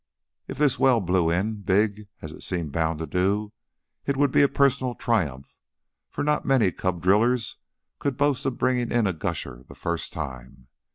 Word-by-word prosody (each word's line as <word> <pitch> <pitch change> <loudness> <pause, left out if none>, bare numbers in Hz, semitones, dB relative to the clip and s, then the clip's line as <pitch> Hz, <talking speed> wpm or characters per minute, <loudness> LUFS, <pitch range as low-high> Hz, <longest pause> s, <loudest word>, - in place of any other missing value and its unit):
If - - -7
this 145 -3 +2
well 130 -3 +5
blew 90 -3 +1
in 100 +5 -1
big, 105 +1 +1 0.2
as 80 - -6
it - - -12
seemed 85 -5 -2
bound 80 +1 0
to 80 - -4
do, 100 +6 0 0.5
it 140 -1 0
would 145 -1 +3
be - - +4
a 140 - +6
personal 135 -3 +1
triumph, 75 - -1 0.5
for - - -4
not 150 0 +1
many 125 -9 +3
cub 90 -2 -3
drillers 115 +5 +2 0.4
could 140 -3 -2
boast 145 -2 +1
of 130 - -2
bringing 125 -2 +1
in 120 -2 +2
a 95 - +1
gusher 60 -6 -4
the 65 - -15
first 85 -1 -3
time. 65 0 -8
105 Hz, 180 wpm, -25 LUFS, 85-125 Hz, 0.5 s, a